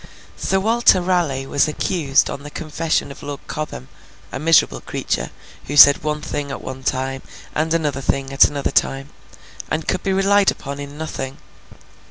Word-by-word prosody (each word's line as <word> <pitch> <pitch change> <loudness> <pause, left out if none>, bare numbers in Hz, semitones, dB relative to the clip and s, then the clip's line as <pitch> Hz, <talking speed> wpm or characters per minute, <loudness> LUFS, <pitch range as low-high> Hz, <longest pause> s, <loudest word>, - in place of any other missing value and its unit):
Sir 190 - 0
Walter 225 -1 +4
Raleigh 175 -7 0
was 140 +2 +1
accused 150 -2 +1
on 140 - -6
the 145 - -9
confession 155 0 -2
of - - -12
Lord 145 -1 -6
Cobham—a 135 - -8
miserable 165 +1 +3
creature, - - -3 0.4
who 145 - -3
said 140 -1 +8
one 150 0 -2
thing 145 -1 -4
at 135 - -6
one 130 0 -7
time, 130 0 -2 0.3
and 160 +1 -1
another 150 -5 0
thing 135 0 -2
at 135 - +7
another 140 -1 -2
time, 135 +2 0 0.6
and 155 0 -2
could 185 - 0
be 195 - -1
relied 195 +1 +3
upon 140 0 -5
in 145 +1 -8
nothing. 135 -4 -5
145 Hz, 165 wpm, -20 LUFS, 135-165 Hz, 0.6 s, said